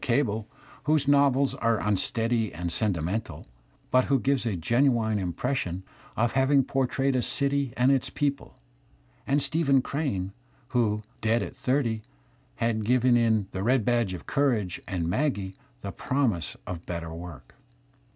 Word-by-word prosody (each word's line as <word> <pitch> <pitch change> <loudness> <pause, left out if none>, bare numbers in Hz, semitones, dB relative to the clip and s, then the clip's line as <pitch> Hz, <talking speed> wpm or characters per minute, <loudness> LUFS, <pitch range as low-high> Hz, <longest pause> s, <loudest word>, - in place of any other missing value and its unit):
Cable, 115 -4 0 0.4
whose 150 -2 +2
novels 140 -1 +4
are 115 -1 +1
imsteady 110 +3 0
and 85 +2 -4
senti 95 -2 0
mental, 100 +7 -4 0.5
but 130 0 +4
who 135 -1 +2
gives 135 -1 +1
a 105 - -1
genuine 115 - +2
impression 95 0 -2 0.3
of 115 +1 +2
having 135 +2 +3
por 135 0 0
trayed 135 +2 0
a 130 - +1
city 140 0 +1
and 125 +2 +4
its 135 -2 +1
people; 145 -1 -2 0.7
and 140 +2 +2
StephenjCrane, 140 - 0 0.4
who, 110 -4 +1 0.2
dead 115 +2 +2
at - - -7
thirty, 125 -4 0 0.5
had 115 -2 0
given 125 +2 +3
in 110 -3 +3
"The 95 - -4
Red 120 +1 +2
Badge 120 -6 +1
of - - -10
Courage" 115 - 0
and 85 -4 -2
"Maggie" 100 - -1 0.3
the 100 - -5
promise 125 - -1
of 85 -1 -6
better 85 -2 -4
work. 85 -5 -10
115 Hz, 145 wpm, -27 LUFS, 100-135 Hz, 0.7 s, novels